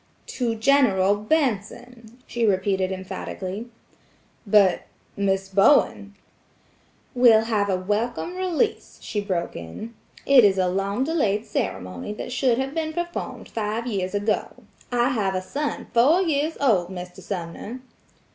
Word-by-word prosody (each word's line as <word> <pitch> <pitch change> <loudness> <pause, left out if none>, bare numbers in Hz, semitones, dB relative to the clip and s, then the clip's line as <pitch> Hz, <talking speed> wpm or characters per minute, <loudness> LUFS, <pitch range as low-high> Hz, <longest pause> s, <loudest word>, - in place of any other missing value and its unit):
"To 235 -3 -2
General 220 -6 +3
Benson," 235 -1 -2
she 240 - -3
repeated 190 -2 +1
emphatically. 190 +3 -6 0.8
"But–Miss 195 -1 +1
Bowen–" 200 0 +3 1.0
"Will 240 -4 +6
have 215 -3 0
a 190 - +2
welcome 225 - -2
release," 370 +4 -1
she 210 - -2
broke 185 -4 -3
in. 85 - -8 0.3
"It 275 -3 +7
is 195 -2 +4
a 185 -1 +2
long 195 +6 -1
delayed 235 -9 0
ceremony 90 - -4
that 225 - -7
should 250 -1 +2
have 265 +1 -2
been 315 -1 -2
performed 345 +1 -5
five 220 +1 -3
years 195 -5 -2
ago. 205 +1 -2 0.3
I 245 +1 +2
have 205 -7 0
a 185 - -1
son 290 +9 -3
four 290 +11 +5
years 310 -1 0
old, 200 -11 +2
Mr. 180 -1 -8
Sumner!" 195 +6 -6
215 Hz, 130 wpm, -24 LUFS, 195-255 Hz, 1.0 s, It